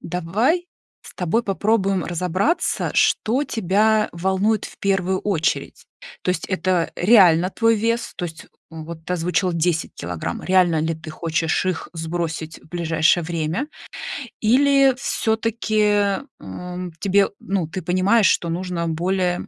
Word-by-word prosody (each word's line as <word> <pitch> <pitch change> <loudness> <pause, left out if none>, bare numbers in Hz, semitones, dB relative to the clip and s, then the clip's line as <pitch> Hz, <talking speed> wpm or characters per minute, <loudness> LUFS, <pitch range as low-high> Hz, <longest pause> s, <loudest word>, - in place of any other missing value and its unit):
Давай 210 - 0 0.4
с - - -13
тобой 185 +6 0
попробуем 195 -2 0
разобраться, 180 - 0
что 250 +6 +2
тебя 215 0 +2
волнует 190 +5 0
в - - -10
1 190 -1 0
очередь. 165 -6 -1 0.4
То - - 0
есть 180 - -2
это 185 -2 0
реально 180 -4 +5
твой 225 +2 +2
вес? 230 +2 -1
То - - -3
есть 165 -2 -8 0.2
вот 160 0 -9
ты 180 - -3
озвучила 180 +1 0
10 170 0 -1
килограмм, 85 -1 -5
реально 180 -4 +3
ли 160 +1 -1
ты 160 0 -10
хочешь 160 0 -1
их 185 -3 -2
сбросить 165 -1 -4
в - - -21
ближайшее 170 0 +2
время? 170 - -2 0.7
Или 275 +4 +4
всё-таки, 215 -4 +1 0.2
м, 180 - -7
тебе, 200 0 +3
ну, 190 -4 -2
ты 180 +3 -5
понимаешь, 185 +5 +3
что 170 - +1
нужно 170 0 -3
более, 180 +2 -1
180 Hz, 135 wpm, -21 LUFS, 165-210 Hz, 0.7 s, реально